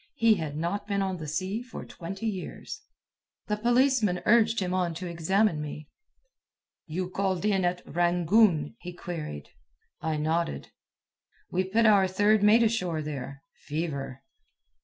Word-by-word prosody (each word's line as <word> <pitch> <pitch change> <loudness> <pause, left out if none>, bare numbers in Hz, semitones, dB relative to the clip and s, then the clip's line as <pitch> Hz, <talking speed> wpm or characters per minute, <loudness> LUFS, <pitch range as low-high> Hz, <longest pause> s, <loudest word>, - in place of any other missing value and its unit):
he 230 -5 +5
had 155 -6 -4
not 195 +6 -2
been 200 -1 0
on 190 -1 -2
the 155 -2 -7
sea 185 +8 -2
for 245 -1 -9
twenty 195 +6 -7
years. 195 -5 -5 0.6
The 210 - -1
policeman 240 -4 +2
urged 225 0 +4
him 185 -2 -2
on 180 -3 0
to 180 +3 -5
examine 170 +1 +1
me. 150 0 -7 1.0
"You 180 +3 -3
called 190 0 -1
in 195 -3 +2
at 175 0 -1
Rangoon?" 175 - +2
he 180 0 -8
queried. 160 - -6 0.5
I 160 -1 -1
nodded. 160 +2 -1 0.8
"We 185 +1 +1
put 220 +5 +2
our 200 -3 +6
third 205 +3 +3
mate 215 +3 +6
ashore 180 -8 0
there. 140 -2 -6
Fever." 140 -4 -5
180 Hz, 140 wpm, -28 LUFS, 160-210 Hz, 1.0 s, our